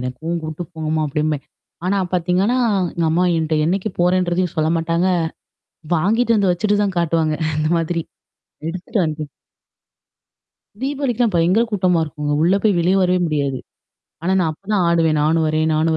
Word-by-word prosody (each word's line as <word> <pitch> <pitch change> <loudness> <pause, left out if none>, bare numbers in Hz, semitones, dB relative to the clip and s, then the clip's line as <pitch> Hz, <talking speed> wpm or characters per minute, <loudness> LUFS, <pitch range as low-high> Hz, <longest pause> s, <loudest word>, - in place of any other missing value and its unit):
எனக்கும் 140 +7 -3
கூட்டு 155 +2 -5
போங்கம்மா 155 -1 -2
அப்படிம்பேன். 150 0 -1 0.4
ஆனா 200 +1 +1
பார்த்தீங்கன்னா, 180 +7 +1 0.4
எங்க 170 -1 0
அம்மா 175 +3 +2
என்கிட்ட 160 -1 0
என்னைக்கு 190 +4 -1
போறேன்றதையும் 180 -1 +1
சொல்ல 155 0 +1
மாட்டாங்க, 165 +2 0 0.9
வாங்கிட்டு 225 +7 +2
வந்து 195 -3 +2
வச்சுட்டு 205 +3 +1
தான் 195 -3 -3
காட்டுவாங்க 165 -2 +1 0.2
அந்த 155 0 0
மாதிரி. 165 0 -1 0.7
எடுத்துட்டு 185 +6 -3
வந்து 155 0 -4 1.6
தீபாவளிக்கெல்லாம் 255 -6 0
பயங்கர 180 +7 +3
கூட்டமா 185 -5 +2
இருக்குங்க. 150 -1 -4
உள்ளே 180 +4 +4
போய் 210 -4 +3
வெளியே 180 +3 +2
வரவே 180 0 +2
முடியாது. 140 -4 -1 0.6
ஆனா 185 +3 0
நான் 165 -3 +1
அப்போ 190 +5 -20
தான் 190 -4 +2
ஆடுவேன், 165 -2 +2
நானும் 160 +2 +2
வரேன் 155 +1 +1
நானும் 160 +1 +1
170 Hz, 145 wpm, -20 LUFS, 155-185 Hz, 1.6 s, உள்ளே